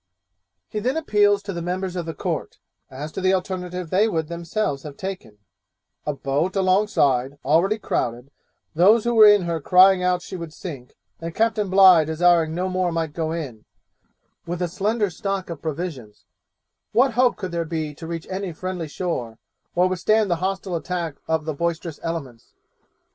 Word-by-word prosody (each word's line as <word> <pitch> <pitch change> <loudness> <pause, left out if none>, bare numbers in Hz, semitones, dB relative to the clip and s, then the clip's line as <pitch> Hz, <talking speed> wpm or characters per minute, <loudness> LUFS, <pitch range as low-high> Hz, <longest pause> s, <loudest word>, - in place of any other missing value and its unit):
He 215 - -4
then 255 +7 -1
appeals 205 -9 +3
to 200 -1 -5
the 170 - -4
members 180 +1 -3
of 175 -2 -4
the 165 - -5
Court, - - -4 0.3
as 145 +4 -7
to - - -5
the 190 +1 +3
alternative 180 -2 -4
they 205 +4 +4
would 160 -6 -2
themselves 170 -3 -2
have 145 -1 -9
taken: 185 - -6 0.7
'A 150 - +1
boat 145 +8 -1
alongside, 185 - +2
already 185 +8 +3
crowded; 125 - -3 0.4
those 205 +7 +5
who 240 - 0
were 220 -2 +8
in 205 -2 +6
her 170 -2 -2
crying 185 +3 +6
out 180 -1 +1
she - - -7
would 170 -3 -7
sink; 140 -8 -9 0.2
and 165 0 -6
Captain 220 -3 +1
Bligh 185 -4 +7
desiring 165 0 +3
no 180 +2 -1
more 185 -1 0
might 165 -2 -2
go 160 -1 -2
in 135 -10 -5 0.8
with 175 +1 -3
a 180 - 0
slender 205 +3 0
stock 195 +1 -3
of 160 - -7
provisions, 155 - -6 0.7
what 255 +1 +4
hope 250 +1 +3
could 185 -3 -5
there 170 -1 -1
be 160 -2 -4
to 160 +2 -9
reach 165 -1 -5
any 190 -1 -4
friendly 180 0 -5
shore, 145 - -4 0.4
or 180 +1 +4
withstand 200 +3 +1
the 170 - +2
hostile 190 0 -2
attacks 170 -3 -4
of 160 -1 0
the 155 - -2
boisterous 170 0 -3
elements? 145 -9 -6
175 Hz, 175 wpm, -23 LUFS, 160-190 Hz, 0.8 s, were